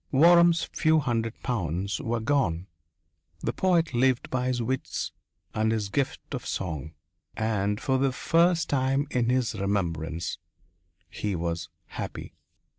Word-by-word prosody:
Waram's 170 +3 +6
few 160 0 +2
hundred 115 -6 -1
pounds 100 - -1
were 120 -4 -1
gone. 110 - +1 0.8
The 115 - -1
poet 170 -4 +2
lived 130 +1 +2
by 125 0 0
his 130 -1 0
wits 125 +3 -2 0.4
and 110 +1 +1
his 105 -3 -1
gift 135 +6 -2
of - - -3
song. 80 -4 -4 0.4
And 105 -2 0
for 130 -1 +1
the 135 0 +2
first 170 +4 +3
time 135 +1 +1
in 120 -1 +1
his 125 -3 +1
remembrance 85 -5 -2 0.7
he 105 -2 -3
was 85 0 -3 0.2
happy. - - -6
120 Hz, 130 wpm, -27 LUFS, 100-140 Hz, 0.8 s, Waram's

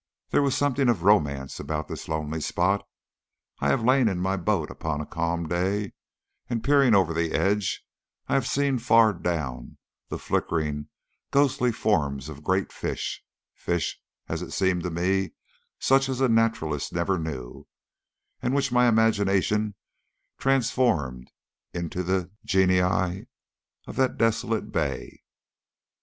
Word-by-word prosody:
There - - +4
was 140 0 +1
something 140 -2 +2
of 100 -8 +1
romance 70 -10 +2
about 75 -1 -3
this - - -7
lonely 80 0 -3
spot. 95 +6 +1 0.8
I - - 0
have 125 - +2
lain 130 0 +4
in 95 -4 0
my 95 +2 0
boat 95 -4 0
upon 80 -2 -3
a 75 - -4
calm 85 +1 -2
day, 95 +4 -1 0.6
and 115 -2 -2
peering 140 -5 +5
over 90 -4 +3
the 80 0 -1
edge 100 -1 0 0.4
I - - -1
have 135 -3 +2
seen 140 -2 +1
far 115 -2 +5
down 80 -8 -4 0.3
the - - -3
flickering, 75 -3 -1 0.4
ghostly 135 -3 +2
forms 75 - 0
of 75 0 -10
great 95 +2 0
fish - - -4 0.3
fish, 85 -3 -2 0.3
as 80 +1 -3
it 90 - -6
seemed 95 -2 +1
to - - 0
me, 95 +3 0 0.4
such 135 0 +3
as 130 -1 -2
naturalist 115 - +1
never 85 +2 0
knew, 65 -6 -6 0.7
and 125 +2 0
which 140 - +1
my 125 0 +4
imagination 105 -2 +2 0.6
transformed 120 - +1 0.5
into 85 +1 -3
the 90 0 -1
genii 95 -2 +2 0.6
of - - -9
that 130 -1 +1
desolate 115 0 0
bay. - - -3
95 Hz, 135 wpm, -26 LUFS, 80-115 Hz, 0.8 s, peering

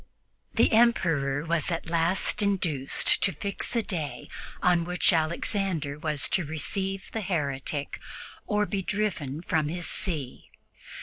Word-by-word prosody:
The - - +4
Emperor 165 -11 +3
was 165 -1 +1
at 165 -1 -2
last 170 +5 +2
induced 170 -9 +2
to 195 - +3
fix 200 +5 -4
a 230 - +2
day 160 -9 -4 0.3
on 175 -1 +4
which 180 +2 +2
Alexander 160 -2 0
was 150 -4 0
to 190 - +2
receive 190 +6 -3
the 225 - -2
heretic 145 -6 -2 0.5
or 210 -1 +2
be 200 -1 -2
driven 175 -8 -2
from 155 -3 +1
his 175 +2 -3
see. 155 -10 -4
170 Hz, 130 wpm, -28 LUFS, 150-195 Hz, 0.5 s, The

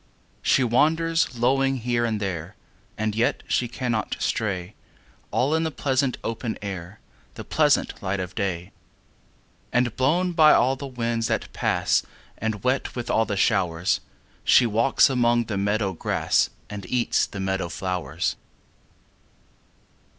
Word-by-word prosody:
She 135 - +3
wanders 160 +3 +2
lowing 135 +3 +2
here 120 -1 0
and 110 -2 -1
there, 95 -1 -4 0.4
And 110 0 -1
yet 115 +3 0
she 120 - +1
cannot 120 -4 -2
stray, 95 -3 -2 0.6
All 140 +4 +1
in 160 - +2
the 160 - 0
pleasant 135 -3 0
open 115 0 -3
air, 95 -1 -7 0.4
The - - -7
pleasant - - +1
light 95 +1 -2
of 90 -1 -5
day; 90 -4 -3 1.0
And 120 -1 +1
blown 170 +8 +2
by 160 -3 +6
all 130 +2 +3
the 140 +1 -7
winds 115 -3 -1
that - - -2
pass - - +1 0.4
And 110 -2 -3
wet 130 +2 0
with 120 -2 -3
all 110 - +3
the 100 - -3
showers, 90 -5 +1 0.4
She 125 - +6
walks 115 +4 +4
among 120 -2 +2
the 110 -2 -4
meadow 100 -1 0
grass 80 - +1 0.2
And 100 -3 -7
eats 125 -2 +1
the 100 - -8
meadow 95 -2 -1
flowers. 90 -1 -2
115 Hz, 140 wpm, -24 LUFS, 100-130 Hz, 1.0 s, by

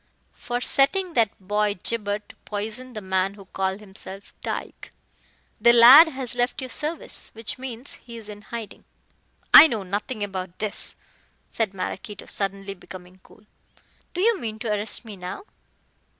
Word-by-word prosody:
"For 245 0 -4
setting 345 +9 +2
that 230 -6 +3
boy 205 +2 0
Gibber 205 -3 0
to 210 - -18
poison 220 +5 -5
the 215 - -6
man 190 0 -1
who 200 -2 -13
called 190 +1 -3
himself 195 -1 -9
Tyke. - - -5 0.7
The 235 - +6
lad 255 +8 +10
has 265 -5 -4
left 245 +1 -1
your 260 -2 -5
service 310 +6 -3
which 225 +3 -5
means 255 0 -6
he 235 -1 -10
is 220 -2 -11
in 205 -1 -10
hiding." 225 -1 -8 0.7
"I - - +12
know 225 -8 -3
nothing 205 +4 -4
about 185 -3 -5
this," 210 -1 0 0.5
said 215 -4 -2
Maraquito, 195 +2 -6
suddenly 195 0 -3
becoming 185 0 -13
cool. 210 - -21 0.7
"Do 360 - -1
you 450 0 +3
mean 220 -3 -5
to 225 0 -5
arrest 210 +3 +3
me 210 -3 -9
now?" 180 - -7
215 Hz, 155 wpm, -24 LUFS, 195-245 Hz, 0.7 s, I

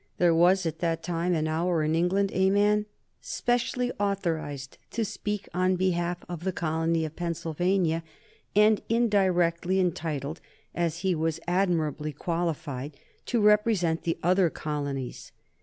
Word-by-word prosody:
There 175 -1 +4
was 180 +3 +4
at 165 0 -3
that 165 -1 -1
time 175 0 0
and 155 -1 0
hour 165 +1 +1
in 155 +1 +1
England 185 +4 +2
a 190 0 +3
man 210 +1 +3 0.3
specially 245 +1 -1
authorized 165 -9 -2
to 225 -1 -1
speak 210 0 -4
on 185 +1 +2
behalf 175 -1 -1
of 175 -2 -6
the 190 - 0
colony 165 -1 0
of 155 0 -7
Pennsylvania, 170 0 0 0.5
and 210 0 +5
indirectly 190 -6 +2
entitled 160 -4 -2 0.3
as 170 0 -1
he 190 -1 +2
was 160 -1 -1
admirably 165 -5 0
qualified 155 -4 -3 0.3
to 235 -3 +1
represent 210 -6 +3
the 165 - -1
other 180 0 +4
colonies. 145 -4 -4
175 Hz, 135 wpm, -27 LUFS, 160-190 Hz, 0.5 s, and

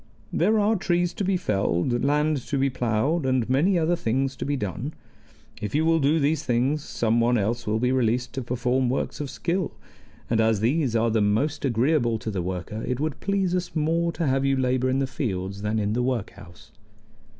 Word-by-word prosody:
"There 215 +6 +3
are 210 +2 +3
trees 175 -2 0
to 205 - -3
be 190 0 +1
felled, 105 - 0
land 150 +2 +2
to 145 - -1
be 135 0 +1
plowed, 125 +6 0
and 130 -3 +1
many 155 +10 +3
other 170 +1 +2
things 135 -1 -1
to - - -4
be 145 +1 -1
done. 110 +7 -4 0.7
If 105 +5 -3
you 155 +2 +2
will 165 0 +3
do 150 +3 +3
these 150 +1 +1
things 130 +5 0
some 115 -4 0
one 120 +1 +3
else 115 +3 -1
will 105 +1 +1
be 125 +2 +1
released 125 -1 0
to 135 - -3
perform 125 +1 0
works 130 - -2
of 145 -2 -4
skill; 170 +4 -2 0.5
and 115 -1 +2
as 110 -2 +2
these 125 +2 +1
are 115 0 +2
the 110 -1 +2
most 110 +9 +1
agreeable 120 -1 +2
to 110 0 -5
the 95 -3 -2
worker, 95 +4 -4
it 125 0 -1
would 155 -1 -2
please 195 -2 0
us 180 -1 -2
more 165 +2 +1
to 165 - -2
have 135 -1 +1
you 135 0 +2
labor 130 0 +1
in 130 - +1
the 135 - +1
fields 100 -7 -4
than 105 +1 -1
in 105 0 0
the 125 - 0
workhouse." 100 -7 -5
130 Hz, 205 wpm, -25 LUFS, 115-155 Hz, 0.7 s, There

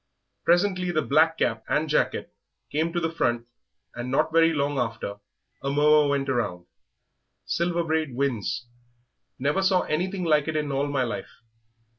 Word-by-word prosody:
Presently 180 +1 +2
the 155 -3 +1
black 160 +4 +3
cap 115 -6 0
and 155 +2 +1
jacket 150 - 0 0.4
came 160 +3 0
to 175 - -1
the 165 -1 -1
front, 120 -7 0 0.5
and 120 +1 -5
not 155 +4 +1
very 165 0 +5
long 145 -2 0
after 115 -3 -3 0.4
a 140 - -2
murmur 150 +1 +4
went 140 -1 0
round, 100 -9 -1 0.8
'Silver 170 0 0
Braid 160 -5 -1
wins.' 125 -3 -1 0.7
Never 145 +8 +1
saw 190 -1 +3
anything 180 +4 -2
like 150 -3 +2
it 160 - -2
in 150 -2 -1
all 140 +1 0
my 140 -2 0
life. 120 - -6
150 Hz, 155 wpm, -26 LUFS, 135-165 Hz, 0.8 s, very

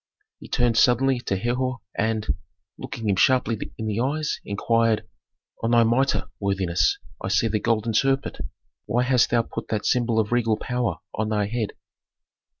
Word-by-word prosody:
He - - -11
turned 120 -2 +2
suddenly 130 +1 +4
to 100 -5 -2
Herhor 125 +4 -1 0.2
and, 110 0 0 0.5
looking 115 -2 -6
him 100 - +3
sharply 120 -1 +2
in 110 - -4
the 110 0 -1
eyes, 150 +5 -1
inquired, 110 +1 +1 0.5
"On 115 - 0
thy 120 0 +5
mitre, 125 +4 +2 0.2
worthiness, 95 -3 +1 0.3
I - - -2
see 100 +4 +2
the 105 -1 0
golden 115 0 0
serpent. 135 +4 +1 0.5
Why 120 +2 +2
hast 125 -2 +3
thou 115 -1 +2
put - - -7
that 105 -1 -2
symbol 120 -2 +1
of 105 0 0
regal 115 -3 +2
power 125 -2 -1 0.2
on 110 0 -2
thy 105 -1 +1
head?" 110 0 -3
115 Hz, 160 wpm, -24 LUFS, 110-125 Hz, 0.5 s, thy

